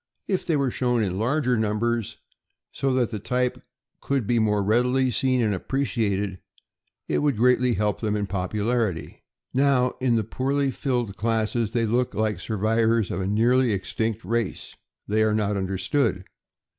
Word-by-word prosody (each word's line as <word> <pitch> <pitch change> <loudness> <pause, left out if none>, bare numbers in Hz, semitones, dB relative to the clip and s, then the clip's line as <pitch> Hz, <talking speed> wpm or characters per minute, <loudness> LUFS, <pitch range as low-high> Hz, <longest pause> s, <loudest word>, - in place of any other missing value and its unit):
If 190 -2 -1
they 165 - +2
were 140 -3 +1
shown 125 -2 +1
in 95 -1 -2
larger 125 +2 +1
numbers, 110 +1 -1 0.5
so 135 - -1
that 125 -3 +1
the 105 - -3
type 125 +3 -1 0.4
could 135 -5 -1
be 120 +2 +2
more 105 -2 +2
readily 125 +5 +2
seen 125 +2 +1
and 105 -2 +1
appreciated, 100 -4 -1 0.7
it - - +1
would 145 -5 +1
greatly 125 +1 +3
help 105 +1 0
them 105 -2 -1
in 105 -1 -1
popularity. 100 - -2 0.3
Now, 130 -2 +3
in 125 -2 +2
the 110 - +1
poorly 135 +5 -1
filled 120 -8 -2
classes, 115 0 0
they 115 -1 +1
look 120 +3 0
like 110 -4 0
survivors 110 +1 +1
of - - -2
a 95 - -2
nearly 120 +3 +3
extinct 110 +3 -2
race. 115 -3 -2 0.3
They 110 +1 +1
are 110 -1 +2
not 105 -1 0
understood. 95 +3 0
115 Hz, 155 wpm, -25 LUFS, 105-125 Hz, 0.7 s, greatly